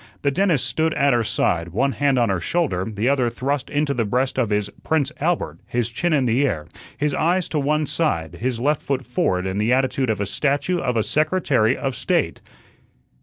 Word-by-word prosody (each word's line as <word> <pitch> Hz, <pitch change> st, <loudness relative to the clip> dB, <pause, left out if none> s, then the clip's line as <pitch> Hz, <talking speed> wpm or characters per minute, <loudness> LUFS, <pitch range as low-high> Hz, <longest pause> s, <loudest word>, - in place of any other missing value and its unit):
The 140 Hz, -, +2 dB
dentist 170 Hz, -3 st, +1 dB
stood 160 Hz, 0 st, 0 dB
at 140 Hz, -1 st, +3 dB
her 120 Hz, -1 st, +2 dB
side, 85 Hz, -5 st, 0 dB
one 115 Hz, +11 st, 0 dB
hand 140 Hz, -1 st, +1 dB
on 120 Hz, -3 st, +2 dB
her 95 Hz, -2 st, 0 dB
shoulder, 95 Hz, -, -1 dB
the 105 Hz, +3 st, -1 dB
other 130 Hz, -3 st, +2 dB
thrust 135 Hz, +3 st, -2 dB
into 145 Hz, -1 st, 0 dB
the 120 Hz, -, 0 dB
breast 125 Hz, +5 st, 0 dB
of 120 Hz, -4 st, +1 dB
his 105 Hz, -1 st, 0 dB, 0.2 s
"Prince 155 Hz, -3 st, +1 dB
Albert," 145 Hz, -, -1 dB
his 120 Hz, -1 st, -1 dB
chin 175 Hz, +8 st, -1 dB
in 140 Hz, -4 st, +2 dB
the 120 Hz, +4 st, +2 dB
air, 80 Hz, -, -1 dB, 0.3 s
his 150 Hz, -1 st, 0 dB
eyes 175 Hz, +4 st, +1 dB
to 155 Hz, -, -1 dB
one 150 Hz, +2 st, +1 dB
side, 95 Hz, -, -1 dB
his 125 Hz, -1 st, -1 dB
left 145 Hz, +4 st, +1 dB
foot 135 Hz, -2 st, -2 dB
forward 95 Hz, -6 st, 0 dB
in 95 Hz, +1 st, -2 dB
the 110 Hz, +3 st, +1 dB
attitude 130 Hz, 0 st, +1 dB
of 110 Hz, -3 st, 0 dB
a 100 Hz, -, 0 dB
statue 145 Hz, -, 0 dB
of 125 Hz, -5 st, -1 dB
a 110 Hz, -, +2 dB
Secretary 145 Hz, -, +1 dB
of 135 Hz, -2 st, -2 dB
State. -, -, 0 dB
130 Hz, 210 wpm, -22 LUFS, 110-150 Hz, 0.3 s, at